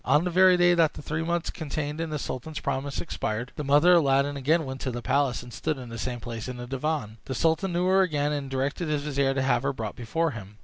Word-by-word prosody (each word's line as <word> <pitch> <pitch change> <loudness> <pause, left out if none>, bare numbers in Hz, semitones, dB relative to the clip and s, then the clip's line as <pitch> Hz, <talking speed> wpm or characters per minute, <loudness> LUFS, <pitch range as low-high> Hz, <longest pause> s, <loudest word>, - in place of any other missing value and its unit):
On 145 +5 +3
the 180 - -1
very 185 +1 +6
day 175 0 +5
that 165 -3 +3
the - - -7
three 155 +2 -2
months 170 +1 -1
contained 155 -2 -4
in 165 - -3
the 155 - -2
sultan's 150 +3 -5
promise 135 +1 -2
expired, 120 -6 -3
the 150 - -4
mother 145 +5 +5
of 175 - +7
Aladdin 140 -1 +2
again 155 +4 +1
went 130 0 -6
to 130 - -2
the 120 -1 -5
palace, 140 -4 +1
and 120 -1 -11
stood 155 +5 -2
in 125 -2 -8
the 115 0 -7
same 125 -1 -3
place 115 -1 -6
in 125 -1 -5
the 120 - -6
divan. 135 -4 -3
The 130 - -4
sultan 165 +4 +1
knew 175 +1 +1
her 190 +1 +4
again, 150 -5 +1
and 145 -2 -3
directed 135 +6 -2
his 150 -1 0
vizier 140 -2 0
to 130 - +1
have 130 -2 +2
her 140 +1 -1
brought 110 -5 -5
before 160 +7 -1
him. 105 -4 -10
145 Hz, 265 wpm, -27 LUFS, 130-160 Hz, -, of